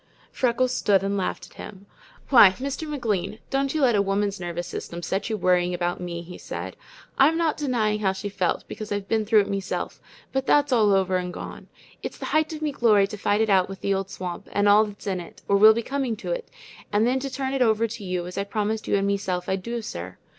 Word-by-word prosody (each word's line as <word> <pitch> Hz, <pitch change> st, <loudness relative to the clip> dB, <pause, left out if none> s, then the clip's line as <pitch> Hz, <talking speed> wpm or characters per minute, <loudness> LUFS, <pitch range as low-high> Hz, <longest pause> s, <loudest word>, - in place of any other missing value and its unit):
Freckles 255 Hz, 0 st, +1 dB
stood 195 Hz, -5 st, +2 dB
and 200 Hz, +1 st, -1 dB
laughed 190 Hz, -2 st, -3 dB
at -, -, -20 dB
him. 195 Hz, -1 st, -10 dB, 0.4 s
"Why, 235 Hz, -7 st, +9 dB
Mr. 275 Hz, +8 st, -4 dB
McLean, 215 Hz, -8 st, -2 dB
don't 275 Hz, 0 st, +1 dB
you 310 Hz, -, +1 dB
let 250 Hz, -3 st, +4 dB
a 200 Hz, -, +4 dB
woman's 200 Hz, 0 st, 0 dB
nervous 175 Hz, -1 st, -4 dB
system 170 Hz, 0 st, -6 dB
set 195 Hz, +6 st, -2 dB
you 220 Hz, -, -1 dB
worrying 180 Hz, -1 st, +2 dB
about 175 Hz, 0 st, -2 dB
me," 170 Hz, -1 st, -5 dB
he 180 Hz, +1 st, -10 dB
said. -, -, -6 dB, 0.4 s
"I'm 305 Hz, +4 st, +5 dB
not 330 Hz, -2 st, +1 dB
denying 230 Hz, -7 st, 0 dB
how 195 Hz, -3 st, +2 dB
she 190 Hz, +2 st, -5 dB
felt, 195 Hz, -3 st, -1 dB
because 215 Hz, -1 st, -7 dB
I've 205 Hz, -1 st, -2 dB
been 220 Hz, 0 st, 0 dB
through 215 Hz, -1 st, +6 dB
it 200 Hz, -, -3 dB
meself, 195 Hz, -1 st, -3 dB, 0.3 s
but 265 Hz, 0 st, -1 dB
that's 290 Hz, -1 st, +4 dB
all 215 Hz, -4 st, +4 dB
over 190 Hz, -1 st, +2 dB
and 180 Hz, 0 st, -3 dB
gone. -, -, -8 dB, 0.3 s
It's -, -, -6 dB
the -, -, -6 dB
height 310 Hz, +1 st, +1 dB
of 310 Hz, -1 st, -6 dB
me 300 Hz, -, 0 dB
glory 220 Hz, -7 st, +4 dB
to 200 Hz, -, -7 dB
fight 205 Hz, +1 st, +1 dB
it 220 Hz, -, +1 dB
out 190 Hz, -1 st, +4 dB
with 195 Hz, -1 st, -8 dB
the 200 Hz, -, +1 dB
old 195 Hz, 0 st, -2 dB
swamp, 180 Hz, -2 st, -6 dB
and 205 Hz, 0 st, +2 dB
all 210 Hz, +2 st, +6 dB
that's 205 Hz, -1 st, -11 dB
in 190 Hz, -2 st, -1 dB
it, 170 Hz, -, -11 dB
or 200 Hz, -, +3 dB
will 215 Hz, +2 st, +8 dB
be 230 Hz, -, -1 dB
coming 270 Hz, -3 st, -2 dB
to 225 Hz, -, -6 dB
it, -, -, -4 dB, 0.4 s
and 210 Hz, +2 st, +3 dB
then 255 Hz, +2 st, +2 dB
to 275 Hz, +1 st, -4 dB
turn 265 Hz, 0 st, -3 dB
it 270 Hz, -, -1 dB
over 225 Hz, -1 st, +3 dB
to 220 Hz, -1 st, -7 dB
you 180 Hz, -2 st, -2 dB
as 180 Hz, +2 st, -5 dB
I -, -, 0 dB
promised 215 Hz, +2 st, -2 dB
you -, -, +2 dB
and 195 Hz, 0 st, +1 dB
meself 190 Hz, -3 st, -1 dB
I'd 190 Hz, 0 st, -1 dB
do, 235 Hz, +3 st, -4 dB
sir. 90 Hz, -, -7 dB
205 Hz, 245 wpm, -25 LUFS, 190-240 Hz, 0.4 s, Why